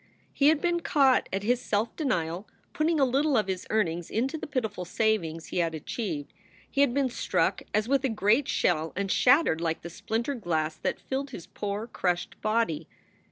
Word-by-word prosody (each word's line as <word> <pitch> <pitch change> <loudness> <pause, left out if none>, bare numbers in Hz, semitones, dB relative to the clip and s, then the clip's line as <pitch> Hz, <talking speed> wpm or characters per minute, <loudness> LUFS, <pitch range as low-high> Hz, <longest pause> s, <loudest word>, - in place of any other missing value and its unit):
He 280 - +3
had 305 -1 +4
been 345 0 +1
caught 275 -5 +3
at 195 +1 -2
his 245 +3 +1
self 215 +2 -1
denial, 180 - -1 0.3
putting 315 +1 +1
a 275 - +5
little 275 +2 +2
of 215 - +2
his 190 -1 -4
earnings 175 -6 0
into 260 +7 -1
the 320 - -5
pitiful 220 -9 -2
savings 175 -5 -1
he - - -1
had 165 -2 0
achieved. 155 -2 -4 0.3
He 275 - 0
had 280 -3 +4
been 270 0 +1
struck - - 0
as 215 +1 +1
with 275 +1 +2
a 265 - +2
great 220 +5 +2
shell 160 -2 +1
and 195 0 -1
shattered 255 - +4
like 165 -1 -1
the 170 - -7
splintered 235 - -3
glass 155 -3 0
that - - -2
filled 275 +1 -3
his 185 -10 -8
poor, 205 +1 -4
crushed 180 -6 -2
body. 215 -7 0
220 Hz, 190 wpm, -28 LUFS, 175-270 Hz, 0.3 s, a